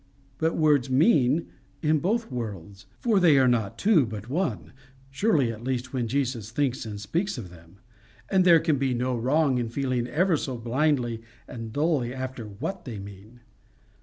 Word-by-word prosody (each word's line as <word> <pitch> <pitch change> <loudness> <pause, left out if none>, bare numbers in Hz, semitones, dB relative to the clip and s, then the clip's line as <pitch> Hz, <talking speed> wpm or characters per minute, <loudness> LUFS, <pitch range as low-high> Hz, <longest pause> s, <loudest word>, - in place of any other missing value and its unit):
But 160 +1 0
words 145 -5 +3
MEAN 145 - +3 0.4
in 155 0 +3
both 220 - -1
worlds, 100 -5 -6
for 225 -5 +2
they 165 -6 +5
are 130 -1 +5
not 115 -5 0
two 200 -8 +4
but 105 +1 -7
one 135 - -2 0.4
surely 140 - +2
at 115 0 -9
least 130 0 -3
when 125 -3 -1
Jesus 125 -4 -2
thinks 130 -1 -1
and 105 -1 -6
speaks 170 - -2
of 95 -8 -7
them; 85 0 -16 0.5
and 190 -1 +3
there 170 -2 +7
can 150 -4 0
be 135 -2 0
no 125 +1 -1
wrong 130 +2 +2
in 120 -2 -2
feeling 125 -1 -1
ever 170 +5 +2
so 130 -3 -4
blindly 120 -1 0 0.3
and 115 -2 -7
dully 145 -3 0
after 130 -3 -5
WHAT 140 - -5
they 120 -5 -7
mean. 100 +4 -12
130 Hz, 170 wpm, -26 LUFS, 115-155 Hz, 0.5 s, there